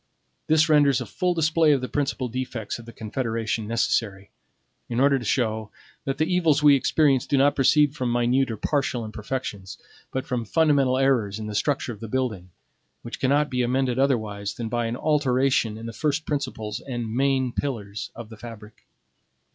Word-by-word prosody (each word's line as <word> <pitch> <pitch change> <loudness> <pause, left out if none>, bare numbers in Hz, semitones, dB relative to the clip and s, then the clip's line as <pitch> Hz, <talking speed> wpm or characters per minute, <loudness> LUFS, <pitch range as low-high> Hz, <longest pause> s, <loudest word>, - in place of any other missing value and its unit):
This 155 0 +4
renders 145 -4 +4
a - - -4
full 180 -1 -1
display 160 -1 +3
of 135 - 0
the 125 - -3
principal 135 -2 -2
defects 120 -3 -4
of 120 - -12
the - - -8
Confederation 115 -1 -3
necessary, 105 -3 -1 0.6
in 120 - -1
order 140 0 +4
to 120 - -8
show 110 -2 0 0.4
that 135 0 -2
the 155 - +2
evils 165 -4 +2
we 145 -1 +8
experience 140 -1 +2
do 140 - +1
not 140 +2 +4
proceed 145 +1 +4
from 125 -4 -1
minute 120 +2 +2
or 110 - -4
partial 130 -1 -1
imperfections, 105 -3 -5 0.3
but 130 0 -3
from 125 -2 -2
fundamental 140 0 +2
errors 125 -7 +1
in 110 - -6
the 105 - -5
structure 130 +2 -1
of 105 - -13
the 115 - -7
building, 110 -7 -2 0.5
which 120 - -7
cannot 145 +3 +2
be 125 -1 0
amended 125 +1 0
otherwise 110 -6 0
than 115 -2 -4
by 120 0 -1
an 115 +2 -3
alteration 130 -6 +1
in 115 - -8
the 115 - -6
first 150 +5 -1
principles 130 -7 -3
and 120 -4 -5
main 135 -1 +1
pillars 115 -6 -4
of 115 -2 -9
the 110 - -11
fabric. 110 -2 -12
125 Hz, 180 wpm, -24 LUFS, 110-140 Hz, 0.6 s, we